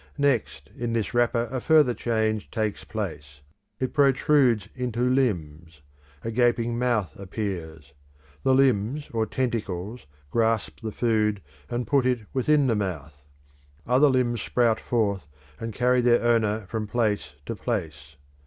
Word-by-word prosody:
Next, 125 - 0
in 120 -1 -3
this 115 0 -1
wrapper 120 0 +2
a 130 -2 -2
further 150 -5 +4
change 110 -3 -1
takes 110 -3 -2
place. 70 0 -6 0.4
It 130 - -2
protrudes 135 -6 +3
into 125 -1 -1
limbs; 85 - -1 0.4
a 115 - -3
gaping 120 0 +1
month 120 -8 +1
appears. 85 -7 -5 0.5
The 130 - +3
limbs 130 +1 +1
or 110 -1 0
tentacles 115 - -3 0.2
grasp 115 -2 0
the 110 -1 -4
food 105 -3 +1 0.3
and 120 0 -2
put 135 -3 +2
it 125 -2 +1
within 145 +2 +3
the 120 -4 +2
mouth; 75 -8 -5 0.6
other 130 +4 +4
limbs 120 -3 +1
sprout 115 -2 +1
forth 100 -10 -1 0.3
and 115 0 -4
carry 125 +3 +2
their 120 -1 +3
owner 110 -3 +2
from 110 +2 -4
place 105 -8 -1
to 115 - -4
place. 80 - -4
115 Hz, 135 wpm, -25 LUFS, 100-125 Hz, 0.6 s, further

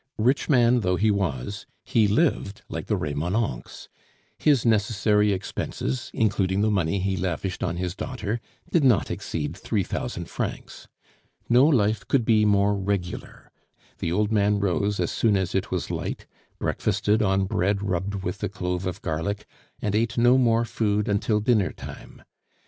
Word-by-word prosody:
Rich 125 +6 +1
man 125 -3 +5
though 90 -4 +1
he 105 +4 +2
was, 95 -2 -2 0.2
he 110 -3 +3
lived 105 -4 0
like - - -5
the - - +1
Remonencqs. 80 - -3 0.5
His 140 -7 +3
necessary 105 -1 +3
expenses, 85 -8 -3
including 100 -3 +1
the 110 +1 +2
money 95 -2 +1
he 95 +1 0
lavished 95 0 -3
on 85 -2 -1
his 90 0 -3
daughter, 115 -2 -4 0.3
did 165 - +3
not 110 - +3
exceed 80 0 -4
three 100 +2 -1
thousand - - -4
francs. - - -5 0.6
No 125 +4 +6
life 110 -8 +2
could 125 -5 +2
be 110 -2 +4
more 100 0 +3
regular; 95 -2 -4 0.5
the 85 - -2
old 105 +4 +1
man 105 -1 +3
rose 100 +1 0
as 90 - 0
soon 105 -3 +2
as 95 -2 -2
it 95 - -1
was - - -2
light, - - -4 0.3
breakfasted 105 +1 0
on 95 -2 +2
bread 100 0 0
rubbed 95 0 -2
with 90 0 -4
a - - -1
clove 90 -1 -3
of 90 +4 -5
garlic, 90 +6 -2 0.4
and 105 - 0
ate 115 +3 0
no 120 +2 +5
more 120 -2 +3
food 105 -2 0
until 105 +1 +1
dinner 105 -3 +2
time. - - -11
100 Hz, 160 wpm, -25 LUFS, 95-110 Hz, 0.6 s, No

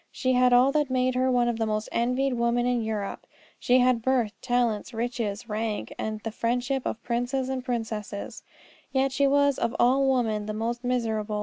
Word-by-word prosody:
She 255 -1 0
had 250 0 +4
all 250 +2 +5
that 295 -1 +1
made 255 0 +1
her 255 +1 +1
one 245 -1 +2
of 235 -1 -1
the 225 - 0
most 215 0 -2
envied 250 +3 0
women 235 0 +1
in 245 -1 +1
Europe; 215 -2 -4 0.3
she 250 - +3
had 250 -2 +3
birth, 245 -3 +1
talents, 240 -2 0
riches, 230 -2 -3
rank, 215 -1 -3
and 215 0 -4
the 225 - -4
friendship 245 +4 -1
of 230 - -5
princes 250 +2 -1
and 260 -1 -3
princesses, 220 -4 -4 0.5
and 265 - +4
yet 270 - 0
she 280 +1 +2
was 285 0 +3
of 235 - -1
all 265 +2 +4
women 220 -5 0
the 215 - -3
most 235 +3 -3
miserable. 220 -4 -1
245 Hz, 195 wpm, -26 LUFS, 225-255 Hz, 0.5 s, all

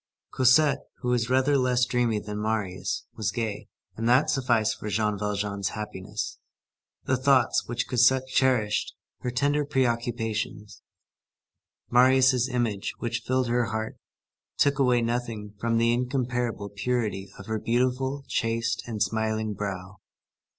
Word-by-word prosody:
Cosette, 130 +3 +4
who 125 - -2
was 120 -1 +1
rather 130 +2 +3
less 125 -1 +2
dreamy 120 -3 +1
than 105 0 -5
Marius, 105 -4 -2
was 110 - -2
gay, 110 -4 -3 0.3
and 115 +1 -1
that 130 +4 +4
sufficed 120 -5 +1
for 105 - -5
Jean 105 0 0
Valjean's 100 -1 -2
happiness. 105 -3 -5 0.6
The 130 - +1
thoughts 130 -1 +3
which 120 0 -2
Cosette 130 +2 +4
cherished, 125 -6 +1 0.2
her 125 - -3
tender 145 +4 +1
preoccupations, 115 -6 -2 1.1
Marius' 130 0 +5
image 115 -6 -1
which 115 0 -3
filled 130 -1 +1
her 120 0 +2
heart, 110 +1 -4 0.6
took 140 0 +2
away 125 -3 +3
nothing 115 -3 -3
from 115 +1 +1
the 115 +1 +3
incomparable 125 -4 -1
purity 100 -2 -2
of 100 - -10
her 110 0 -2
beautiful, 130 +4 0
chaste, 115 -1 -1
and 110 -3 0
smiling 110 +1 -1
brow. 95 -1 -5
115 Hz, 130 wpm, -26 LUFS, 105-125 Hz, 1.1 s, Marius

